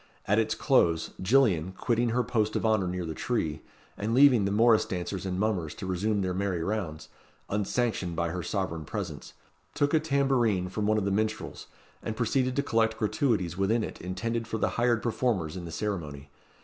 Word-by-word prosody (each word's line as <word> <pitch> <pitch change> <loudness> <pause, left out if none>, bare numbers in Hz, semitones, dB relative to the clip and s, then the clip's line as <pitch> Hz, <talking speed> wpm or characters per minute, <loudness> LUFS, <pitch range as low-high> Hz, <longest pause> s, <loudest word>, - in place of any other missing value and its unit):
At 105 +3 +3
its 110 0 0
close, 85 - +2
Gillian, 95 - +3
quitting 120 +3 0
her 125 +2 +1
post 110 -2 0
of - - 0
honour 110 -4 +2
near 90 0 -3
the 80 - -4
tree, 80 -8 -2 0.3
and 110 +3 -1
leaving 130 -6 +6
the 100 - 0
morrice 110 +1 +5
dancers 95 +1 -4
and 90 0 -2
mummers 95 -8 -1
to - - -7
resume 100 +3 0
their 90 -1 -1
merry 95 -3 -1
rounds, 95 -6 -3 0.4
unsanctioned 105 -3 -1
by 85 0 0
her 90 +2 -3
sovereign 85 -5 -3
presence, 85 -3 -6 0.4
took 145 +1 +1
a 160 - +5
tambourine 135 - +1
from 105 +3 -2
one 110 0 +3
of 105 - 0
the 100 - 0
minstrels, 110 +2 -2 0.3
and 110 -1 -4
proceeded 125 +2 +1
to 140 - +1
collect 115 -3 +1
gratuities 105 -6 0
within 110 +4 +2
it - - -7
intended 115 +6 -3
for 110 - -2
the 105 - +1
hired 120 -1 +1
performers 110 -9 0
in 90 -2 -6
the 85 - -7
ceremony. 75 -7 -4
105 Hz, 190 wpm, -28 LUFS, 90-115 Hz, 0.4 s, leaving